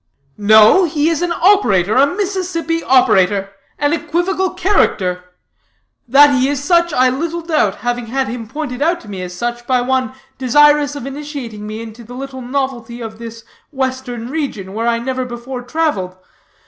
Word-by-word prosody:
"No, 215 - +6
he 305 -1 0
is 330 - -1
an 350 -1 -1
operator, 325 - +3
a 275 +2 +5
Mississippi 360 -3 -2
operator; 195 -6 +3 0.3
an 290 +1 +1
equivocal 350 +4 -1
character. 185 - 0 0.8
That 285 +4 +6
he 260 0 +2
is 285 -1 -2
such, 340 +1 +3
I 255 -2 +3
little 335 +5 -3
doubt, 305 - +1
having 245 -1 -2
had 265 +3 -1
him 230 -2 -6
pointed 285 0 -5
out 340 +3 +1
to 230 - -15
me 195 -3 -6
as 180 -1 -6
such 240 +4 -4
by 255 -1 +2
one 255 -1 -1 0.3
desirous 290 +2 +4
of 285 - -6
initiating 270 -7 -7
me 215 +1 -6
into 225 +1 -11
any 240 +2 -11
little 270 -1 -7
novelty 245 -2 -3
of 220 -1 -8
this 230 -1 -9 0.3
western 260 -3 -4
region, 240 -12 -4
where 225 +2 -2
I 235 0 +2
never 255 +2 -3
before 245 +1 -7
traveled. 245 - -2
260 Hz, 165 wpm, -17 LUFS, 230-300 Hz, 0.8 s, No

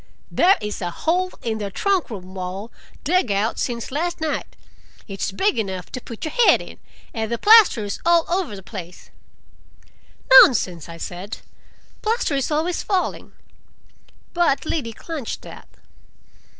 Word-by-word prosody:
"There 380 +3 +4
is 210 0 -5
a 175 - -2
hole 360 - -1
in 225 -3 -2
the 205 -1 -3
trunk 380 - 0
room 190 -4 -8
wall, 190 +4 -6 0.3
dug 360 - +2
out 200 +3 0
since 235 -1 -3
last 340 +5 -2
night. 315 -1 -3 0.5
It's 195 -1 -3
big 385 - +1
enough 190 -4 -4
to 255 - -6
put 230 +3 -8
your 315 - -3
head 485 -2 +5
in, - - -11 0.3
and 225 -1 -3
the 235 - 0
plaster's 370 - +5
all 340 -1 +4
over 350 - -1
the 195 - -10
place." 180 -4 -10 1.3
"Nonsense!" 180 - +2
I 165 - -8
said. 180 +5 -6 0.6
"Plaster 445 -7 0
is 275 -2 0
always 320 +3 0
falling." 380 -3 -2 1.0
But 340 -5 +1
Liddy 260 -9 -3
clenched 300 -1 -6
that. - - -11
235 Hz, 145 wpm, -22 LUFS, -, 1.3 s, head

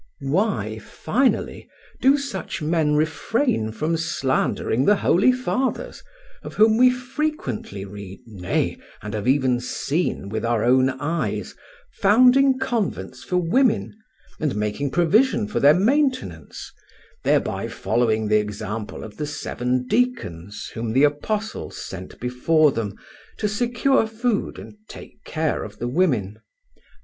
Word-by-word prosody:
Why, 135 - 0
finally, 245 - -1 0.3
do 270 +2 +5
such 275 -9 -5
men 155 -1 +1
refrain 155 - 0
from 155 +8 -1
slandering 135 -5 0
the 205 - +5
holy 195 +5 +4
fathers, 255 - -2 0.4
of - - -9
whom 220 +1 +5
we 255 +1 +7
frequently 250 - -3
read, 100 -1 -9
nay, 100 -6 -2 0.2
and 105 0 -6
have 110 +2 -3
even 130 -2 +3
seen 135 - -2
with 110 +2 -3
our 115 -2 +1
own 130 +2 +4
eyes, 145 +6 -3 0.5
founding 255 +6 +5
convents 240 -6 -3
for 180 - -1
women 215 +8 +2 0.5
and 150 -6 -1
making 105 +7 -1
provision 210 - +3
for 210 - -2
their 145 +2 +6
maintenance, 260 +6 0 0.5
thereby - - +1
following 110 -2 0
the 105 0 +4
example 105 +1 -5
of 110 -2 -10
the 150 - -3
seven 125 -3 -2
deacons 105 - -2
whom 115 -1 -3
the 135 +4 +4
apostles 210 +10 -1
sent 95 -1 -8
before 140 +5 +3
them 110 -5 -4 0.4
to 210 - 0
secure 240 +3 +1
food 225 0 -1
and - - -11
take 215 - -12
care 160 -1 -1
of 105 -1 -9
the 120 - -3
women? 120 - 0
155 Hz, 130 wpm, -23 LUFS, -, 0.5 s, we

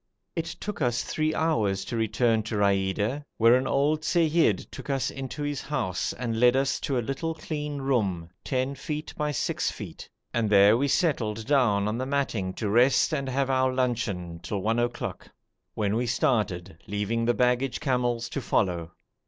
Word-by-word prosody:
It 165 -2 -1
took 210 -5 -5
us 120 -2 +1
three 155 0 -1
hours 110 -12 +1
to 120 - -4
return 110 +1 +2
to - - -2
Raida, 100 +6 +1
where 115 +1 +6
an 130 +1 +2
old 150 +3 +2
seyyid 160 - +2
took - - -9
us 135 -3 0
into 135 +2 -5
his 145 -1 -2
house 120 -11 -2
and 115 -3 -3
led 125 +1 +5
us 135 +1 +1
to 135 - -1
a 120 - -1
little 160 +5 -2
clean 150 -2 -4
room, 105 -11 0 0.2
10 130 +1 -1
feet 150 +2 -5
by 150 0 -1
6 - - -1
feet, - - -9 0.2
and 115 -3 +1
there 100 +1 +6
we 140 +4 +1
settled 115 - 0
down 115 -7 +3
on 110 +3 -2
the 130 - -2
matting 135 -9 -1
to 110 - -2
rest 125 +8 +4
and 140 -3 -1
have 135 +1 0
our 130 0 +2
luncheon 110 -10 -2
till 100 0 -4
one 115 +2 +1
o'clock, 120 0 -3 0.5
when 105 -1 0
we 120 +2 0
started, 100 -8 0
leaving 105 +3 -1
the 120 0 +2
baggage 125 +1 +1
camels 120 -3 0
to 140 - -3
follow. 85 -8 0
125 Hz, 175 wpm, -27 LUFS, 105-140 Hz, 0.5 s, where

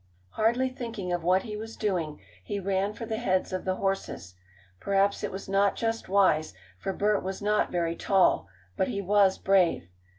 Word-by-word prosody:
Hardly 240 +4 +1
thinking 230 -8 -5
of 175 -1 -2
what 185 +2 +3
he 215 -3 -6
was 220 +1 -7
doing, 175 -8 -2 0.2
he 200 - -3
ran 195 +1 0
for 230 - -6
the 220 0 -3
heads 185 -5 0
of 185 - -3
the 185 0 0
horses. 195 - -3 0.5
Perhaps 200 +1 +1
it 205 - -2
was 190 +1 -7
not 195 +1 +2
just 225 -2 -2
wise, 185 - +3 0.2
for 195 - -2
Bert 205 +1 +1
was 190 +1 -4
not 210 +1 +1
very 170 -1 0
tall, 190 - +2 0.3
but 190 - +1
he 210 -6 -3
was 200 0 +3
brave. 185 - +2
195 Hz, 185 wpm, -28 LUFS, 185-210 Hz, 0.5 s, what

